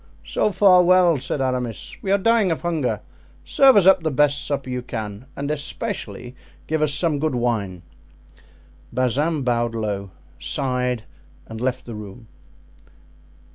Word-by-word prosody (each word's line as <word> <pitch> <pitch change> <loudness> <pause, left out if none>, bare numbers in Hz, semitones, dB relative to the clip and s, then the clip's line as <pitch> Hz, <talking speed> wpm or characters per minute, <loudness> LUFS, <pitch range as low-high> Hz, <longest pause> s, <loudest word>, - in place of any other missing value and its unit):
"So 210 - 0
far 185 -1 +6
well," 180 -3 +4
said 135 +2 -3
Aramis; 125 -4 -3
"we 195 - -5
are 200 - +5
dying 225 -1 +3
of 165 - -2
hunger. 160 -7 -1 0.4
Serve 270 -1 +5
us 195 - +5
up 190 -1 +6
the 160 - 0
best 145 0 +2
supper 140 -2 -3
you 125 -1 -3
can, 110 -1 -6
and 140 +1 -3
especially 125 -4 -5 0.3
give 160 0 -1
us 155 -1 +2
some 150 0 +1
good 155 -3 -1
wine." 105 -7 -2 1.1
Bazin 135 +5 0
bowed 120 -2 0
low, 100 -3 -3 0.3
sighed, 125 -4 -1 0.4
and 110 0 -8
left 130 0 -2
the 120 - -7
room. 105 +2 -10
135 Hz, 145 wpm, -22 LUFS, 120-160 Hz, 1.1 s, far